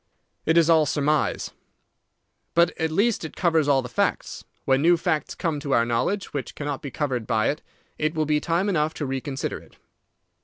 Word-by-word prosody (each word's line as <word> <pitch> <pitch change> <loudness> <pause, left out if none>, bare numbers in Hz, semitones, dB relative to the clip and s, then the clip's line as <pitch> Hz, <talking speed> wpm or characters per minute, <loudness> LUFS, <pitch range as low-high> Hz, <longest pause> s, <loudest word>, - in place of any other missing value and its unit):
"It 160 +1 +4
is 165 -2 +5
all 160 -3 +5
surmise." 150 +1 0 1.0
"But 170 +1 +5
at 160 -1 +1
least 205 +7 +1
it 160 - -7
covers 165 -4 +2
all 135 -2 +3
the - - -5
facts. - - -1 0.2
When 135 0 +3
new 170 +2 +5
facts 155 -3 -1
come 160 -3 -2
to 140 -2 -2
our 115 - +4
knowledge 120 +13 -1
which 140 -3 -4
cannot 145 -2 -4
be 140 - -5
covered 130 -4 -2
by 110 -2 +2
it, 150 - -7 0.4
it 155 +1 0
will 155 -1 +1
be 150 0 +2
time 170 +4 0
enough 155 -5 0
to 150 - -3
reconsider 135 0 -3
it. - - -20
150 Hz, 190 wpm, -24 LUFS, 140-165 Hz, 1.0 s, is